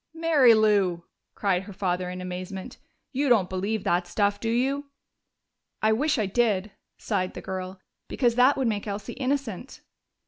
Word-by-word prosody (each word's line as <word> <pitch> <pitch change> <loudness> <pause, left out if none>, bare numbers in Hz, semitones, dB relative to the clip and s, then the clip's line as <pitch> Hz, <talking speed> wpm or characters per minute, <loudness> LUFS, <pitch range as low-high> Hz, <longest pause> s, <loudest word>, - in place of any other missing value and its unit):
"Mary 305 -8 +5
Lou!" 200 -5 +2 0.3
cried 190 -3 +1
her 200 +1 -10
father 180 -1 -1
in 180 0 -6
amazement. 185 +5 -6 0.3
"You 280 +1 0
don't 205 -7 +3
believe 195 +3 -2
that 175 +1 +1
stuff, 205 -1 0
do 225 - -2
you?" 270 +5 0 0.9
"I 220 0 +3
wish 295 +6 +1
I 215 - +1
did," 205 -1 +1 0.3
sighed 185 -4 -2
the - - -5
girl. 185 0 -6 0.3
"Because 240 -3 +1
that 250 +4 +4
would 265 -3 +1
make 210 -1 -2
Elsie 200 0 -5
innocent." 265 -4 -3
210 Hz, 160 wpm, -26 LUFS, 185-245 Hz, 0.9 s, Mary